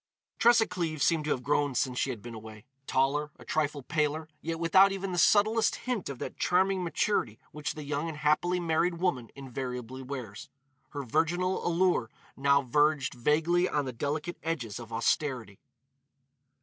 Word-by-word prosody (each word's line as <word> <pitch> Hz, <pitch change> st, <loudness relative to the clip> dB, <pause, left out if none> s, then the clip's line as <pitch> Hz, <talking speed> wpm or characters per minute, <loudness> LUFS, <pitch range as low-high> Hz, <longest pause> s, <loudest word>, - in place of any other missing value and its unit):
Tressa 235 Hz, -1 st, +6 dB
Cleves 165 Hz, -6 st, -2 dB
seemed 160 Hz, -3 st, +2 dB
to -, -, -2 dB
have 130 Hz, -4 st, -1 dB
grown 145 Hz, 0 st, +1 dB
since 125 Hz, 0 st, 0 dB
she -, -, 0 dB
had 120 Hz, -6 st, -5 dB
been 120 Hz, -1 st, -8 dB
away. 110 Hz, 0 st, -10 dB, 0.2 s
Taller, 140 Hz, +3 st, +1 dB
a -, -, -14 dB
trifle 150 Hz, -2 st, -1 dB
paler, 155 Hz, +1 st, -1 dB
yet 165 Hz, 0 st, -3 dB
without 190 Hz, +4 st, +5 dB
even 195 Hz, 0 st, -3 dB
the 175 Hz, -, -1 dB
subtlest 215 Hz, +4 st, +4 dB
hint 245 Hz, -, -3 dB
of 140 Hz, -, -5 dB
that -, -, -6 dB
charming 185 Hz, +1 st, +2 dB
maturity 165 Hz, -, 0 dB
which 150 Hz, 0 st, -4 dB
the 155 Hz, -, -6 dB
young 145 Hz, +2 st, -2 dB
and 155 Hz, -, -7 dB
happily 155 Hz, +4 st, +2 dB
married 170 Hz, +1 st, +1 dB
woman 165 Hz, -10 st, -1 dB
invariably 130 Hz, -1 st, -6 dB
wears, 125 Hz, -6 st, -7 dB, 0.4 s
her 145 Hz, -1 st, -5 dB
virginal 175 Hz, +9 st, 0 dB
allure 175 Hz, -9 st, +2 dB, 0.3 s
now 140 Hz, +1 st, +3 dB
verged 145 Hz, +1 st, +2 dB
vaguely 160 Hz, +8 st, +2 dB
on 145 Hz, -2 st, 0 dB
the 130 Hz, -, -5 dB
delicate 150 Hz, +7 st, -3 dB
edges 130 Hz, -10 st, -3 dB
of 115 Hz, -1 st, -10 dB
austerity. 115 Hz, -2 st, -1 dB
150 Hz, 165 wpm, -29 LUFS, 130-175 Hz, 0.4 s, Tressa